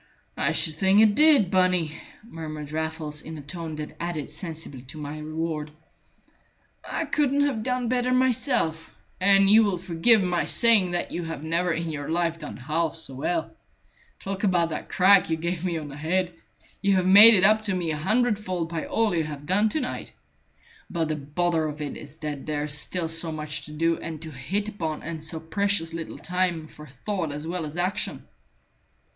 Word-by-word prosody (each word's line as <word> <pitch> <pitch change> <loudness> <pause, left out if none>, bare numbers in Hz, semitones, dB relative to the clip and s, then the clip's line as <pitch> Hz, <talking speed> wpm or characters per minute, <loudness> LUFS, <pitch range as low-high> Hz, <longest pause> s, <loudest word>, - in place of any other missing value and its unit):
"I - - +1
should 160 - +1
think 190 +4 +4
it 215 -1 +6
did, 290 - +5
Bunny," 180 -4 +2 0.3
murmured 155 -8 -8
Raffles, 160 -1 -3
in 160 0 -8
a - - -7
tone 160 +1 -6
that 150 0 -7
added 165 -4 -4
sensibly 160 -5 -7
to 130 +5 -9
my 150 0 -6
reward. 155 0 -4 1.1
"I 330 - -3
couldn't 285 -1 +1
have 260 -6 -1
done 250 +1 -1
better 250 +1 0
myself, 250 - +1 0.3
and 195 +1 +5
you 220 +3 +7
will 200 -4 0
forgive 185 +5 +3
my 180 -1 0
saying 225 -6 +5
that 175 0 -2
you 175 - -3
have 165 -3 -6
never 170 +2 0
in 165 0 -2
your 145 -2 -5
life 165 0 0
done 150 - -8
half 155 +5 -1
so 160 -4 -7
well. 320 - -2 0.6
Talk 195 +1 -5
about 175 -4 +2
that - - -5
crack 190 0 +5
you 160 - 0
gave 170 +1 -3
me 175 -3 -1
on 155 -2 -6
the 140 - -9
head! 180 +4 -1 0.5
You 200 0 +3
have 185 -1 +1
made 205 +4 +10
it 185 - +3
up 215 +2 +5
to 195 -3 0
me 170 -3 -1
a 155 - -2
hundredfold 200 -2 0
by 165 -2 -4
all 225 -5 +1
you 160 -2 0
have 145 -1 -7
done 205 +6 +2
to 310 - -1
night. 255 - -5 0.8
But 165 -3 -1
the 155 - 0
bother 155 +3 -1
of 150 0 -6
it 150 -2 -4
is 145 +1 -11
that 150 -3 -6
there's 150 -1 -2
still 165 +3 -2
so 165 0 -1
much 150 -2 -4
to 150 - -10
do, 165 +2 0
and 160 -2 -6
to 160 - -7
hit 170 +11 -2
upon, 165 -7 -4
and 160 -1 -5
so 160 0 -4
precious 165 0 0
little 165 -1 -6
time 180 -3 -1
for 150 0 -13
thought 165 +5 -4
as 150 +2 -5
well 170 -1 -3
as 150 +3 -8
action." 180 +2 -2
170 Hz, 195 wpm, -25 LUFS, 155-195 Hz, 1.1 s, made